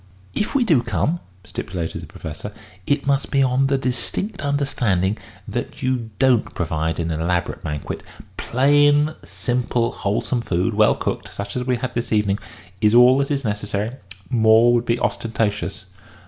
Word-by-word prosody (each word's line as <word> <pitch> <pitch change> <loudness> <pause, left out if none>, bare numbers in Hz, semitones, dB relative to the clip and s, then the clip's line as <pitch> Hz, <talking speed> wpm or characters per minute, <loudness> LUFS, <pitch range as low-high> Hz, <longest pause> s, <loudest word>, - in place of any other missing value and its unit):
"If 210 - -2
we 270 - +4
do 160 - +4
come," 160 +7 -1 0.3
stipulated 85 -3 -4
the - - -10
Professor, - - -7 0.4
"it 145 0 +1
must 140 -1 +1
be 135 -1 +3
on 130 +1 +2
the 135 0 +2
distinct 135 - -1
understanding 120 -10 +1 0.3
that - - -5
you 125 -3 -1
don't 130 -4 +2
provide 80 -1 -1
an 85 0 -1
elaborate 85 +2 -1
banquet. 75 -2 -4 0.3
Plain, 145 +3 +3
simple, 120 -1 -1
wholesome 110 +4 -1
food, 95 +1 0
well 105 +1 +4
cooked, - - -3
such 100 0 -5
as 125 0 -2
we 125 -1 +1
have 115 - -7
had 130 - -2
this 120 0 -3
evening, 105 -2 +2 0.4
is 105 +1 +4
all 125 +2 +7
that 140 - 0
is 140 -3 -1
necessary. 105 0 -2 0.4
More 115 0 +5
would 120 0 +1
be 115 +1 +1
ostentatious." 110 -2 -1
120 Hz, 160 wpm, -22 LUFS, 105-135 Hz, 0.4 s, all